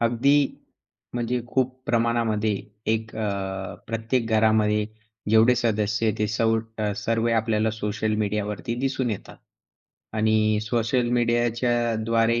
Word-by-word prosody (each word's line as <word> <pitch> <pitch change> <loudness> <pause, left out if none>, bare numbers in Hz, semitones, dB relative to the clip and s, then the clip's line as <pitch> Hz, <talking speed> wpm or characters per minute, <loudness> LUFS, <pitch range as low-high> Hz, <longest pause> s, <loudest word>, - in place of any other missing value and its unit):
अगदी 120 +5 +3 0.8
म्हणजे 120 0 -1
खूप 130 +1 0
प्रमाणामध्ये 115 -2 +1 0.4
एक 110 0 -3
अ, 95 -3 -3
प्रत्येक 115 +2 -1
घरामध्ये 110 -1 +3 0.4
जेवढे 110 +3 +6
सदस्य 110 -1 +1
ते 105 - +1
सव 115 +1 +2 0.4
सर्व 115 +2 0
आपल्याला 110 0 +1
सोशल 105 0 -2
मीडियावरती 105 0 -2
दिसून 130 -2 0
येतात 105 - -6 0.8
आणि 110 0 +3
सोशल 120 +2 0
मीडियाच्याद्वारे 115 -1 +1
110 Hz, 100 wpm, -25 LUFS, 110-120 Hz, 0.8 s, जेवढे